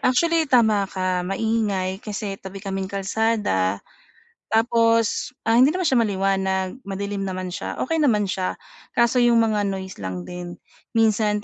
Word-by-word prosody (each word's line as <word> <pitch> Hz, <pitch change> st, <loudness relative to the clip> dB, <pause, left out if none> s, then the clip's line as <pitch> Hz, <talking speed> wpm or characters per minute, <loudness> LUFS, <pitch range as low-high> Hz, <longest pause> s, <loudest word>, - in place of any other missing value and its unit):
actually, 325 Hz, +5 st, +2 dB
tama 220 Hz, -6 st, +3 dB
ka, 185 Hz, -1 st, -1 dB
maingay 195 Hz, -3 st, -1 dB
kasi, 205 Hz, -2 st, -5 dB
tabi 190 Hz, +1 st, -9 dB
kaming 195 Hz, -1 st, -4 dB
kalsada. 195 Hz, -, 0 dB, 0.6 s
Tapos, 230 Hz, +1 st, +2 dB
ah, 225 Hz, +1 st, +3 dB
hindi 280 Hz, +6 st, +5 dB
naman 370 Hz, -, -1 dB
siya 265 Hz, -7 st, +3 dB
maliwanag, 190 Hz, 0 st, 0 dB
madilim 200 Hz, 0 st, -3 dB
naman 185 Hz, -1 st, -4 dB
siya, -, -, -5 dB
okey 325 Hz, +4 st, -1 dB
naman 235 Hz, -9 st, +3 dB
siya, 185 Hz, -1 st, -2 dB, 0.4 s
kaso 235 Hz, +1 st, +3 dB
'yong 240 Hz, -1 st, +4 dB
mga 210 Hz, -2 st, +1 dB
noise 190 Hz, -1 st, -5 dB
lang 95 Hz, -2 st, -5 dB
din, 175 Hz, -, -7 dB, 0.4 s
minsan 215 Hz, -2 st, +2 dB
205 Hz, 140 wpm, -23 LUFS, 190-230 Hz, 0.6 s, hindi